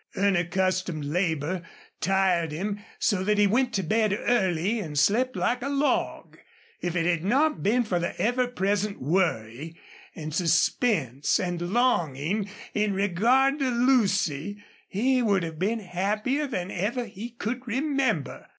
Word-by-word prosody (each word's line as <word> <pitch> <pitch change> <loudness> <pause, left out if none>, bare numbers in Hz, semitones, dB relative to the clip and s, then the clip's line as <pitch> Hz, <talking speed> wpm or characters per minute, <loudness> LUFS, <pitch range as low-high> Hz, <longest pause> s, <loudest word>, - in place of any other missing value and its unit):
Unaccustomed 185 -3 0
labor 165 +1 -1 0.4
tired 180 -2 +1
him 200 +6 -3 0.2
so 195 -4 +1
that 210 +2 +1
he 205 - +5
went 245 +5 +2
to 195 - 0
bed 215 +4 +1
early 190 -2 +1
and 155 -7 -5
slept 250 - +2
like 245 +1 0
a 275 - -3
log. 285 +1 -1 0.4
If 175 -1 -2
it 165 -1 +1
had 170 -2 +1
not 290 +10 +2
been 235 +5 +2
for 185 -6 -1
the 170 - -4
ever 245 +2 +1
present 205 -2 -1
worry 155 - -1 0.4
and 155 -1 -6
suspense 165 - +1
and 175 -2 -2
longing, 185 - 0 0.2
in 210 -2 0
regard 235 - +2
to 270 -2 +1
Lucy, 205 - +1 0.2
he 255 +6 +1
would 200 -6 +2
have 160 -2 -6
been 215 +5 0
happier 210 +10 -1
than 185 -8 -4
ever 230 +7 -2
he 220 +2 -8
could 240 +2 -5
remember. 260 - -1
200 Hz, 140 wpm, -26 LUFS, 175-240 Hz, 0.4 s, he